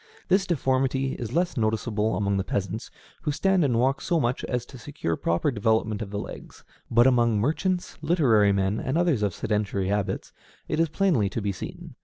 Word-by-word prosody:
This 190 0 +3
deformity 135 -3 +1
is 115 -3 -5
less 175 +4 0
noticeable 110 -2 0
among 100 0 0
the 95 - 0
peasants, 100 +3 -3 0.3
who 150 - -1
stand 190 +4 +2
and 125 -5 +2
walk 130 +3 +1
so 170 - +1
much 125 -2 -1
as 125 -2 -2
to 130 0 -12
secure 120 - -3
proper 85 - 0
development 110 -1 0
of 105 - -5
the 100 - -4
legs; 105 - -8 0.3
but 120 +1 +5
among 120 -4 +3
merchants, 175 - -1
literary 130 - +4
men, 100 +2 0
and 130 +4 -1
others 170 -9 +2
of 105 -2 +1
sedentary 105 -3 -1
habits, 100 -1 -2 0.3
it 155 - -1
is 165 - +4
most - - -29
plainly 165 - +2
to 105 - -3
be 100 -2 -1
seen. 95 - -8
120 Hz, 195 wpm, -26 LUFS, 105-145 Hz, 0.3 s, but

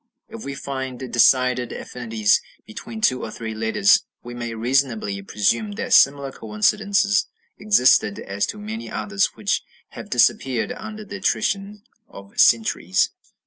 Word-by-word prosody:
If 225 0 -9
we 140 - -5
find 130 -2 -5 0.2
decided 125 0 +3
affinities 110 -4 0 0.2
between 220 - -8
two 130 -11 +2
or 115 - -4
three 110 0 -6
letters, 110 -2 +3 0.2
we 120 - -8
may 120 -1 -5
reasonably 115 -4 0
presume 105 - 0
that 240 +4 -3
similar 140 0 +4
coincidences 200 - +1 0.3
existed 130 - +3
as 100 +1 -3
to 210 - -6
many 215 +2 -6
others 205 -2 -1
which 210 +1 -1 0.3
have - - -10
disappeared 130 - +1
under 215 0 -8
the 205 0 -7
attrition 205 +1 -1 0.3
of 100 0 -12
centuries. 95 -5 +3
130 Hz, 135 wpm, -22 LUFS, -, 0.3 s, similar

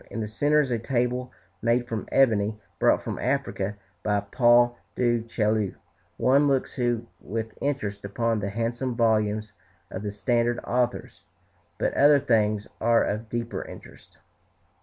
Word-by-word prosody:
In - - -5
the 110 - -2
centre 145 +7 +2
is 135 -4 -2
a 120 - 0
table 125 +1 -1 0.3
made 120 +1 +1
from 115 -3 -4
ebony, 110 -5 +3 0.2
brought - - +3
from - - -4
Africa 125 -6 -1 0.3
by 105 0 +1
Paul 120 +3 +4 0.2
du 120 -2 +2
Chaillu. 110 -3 0 0.4
One 140 +3 +4
looks 135 -1 0 0.4
with 110 +1 -4
interest 105 -8 -2
upon 115 +2 -1
the 100 0 -2
handsome 120 +4 -2
volumes 110 -2 +1 0.4
of 95 - -5
the 105 - -3
standard 120 +3 0
authors, 125 -1 -1 0.6
but - - 0
other 145 0 +6
things 105 -4 +1
are 115 0 +4
of 110 +2 -3
deeper 120 0 -3
interest. - - -13
115 Hz, 140 wpm, -26 LUFS, 105-125 Hz, 0.6 s, other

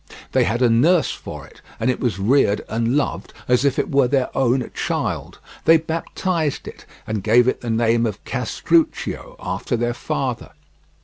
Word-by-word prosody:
They - - +3
had 120 +5 0
a 120 - +5
nurse 155 +7 +3
for - - -8
it, - - -18 0.2
and 115 - 0
it - - -4
was 115 -8 -1
reared 105 0 +2
and 115 +4 0
loved 150 - -2
as 125 +1 +3
if 140 -2 +1
it - - -1
were 140 -2 +4
their 135 0 0
own 130 -1 +1
child. - - -3 0.3
They 165 - +7
baptized 160 0 -2
it, - - -11 0.2
and 110 -2 -3
gave 115 +4 +4
it - - 0
the 120 - -5
name 115 +1 +2
of 105 - -7
Castruccio 165 -1 -1
after 120 - -3
their 120 +1 0
father. 125 0 -3
125 Hz, 175 wpm, -21 LUFS, 115-140 Hz, 0.3 s, They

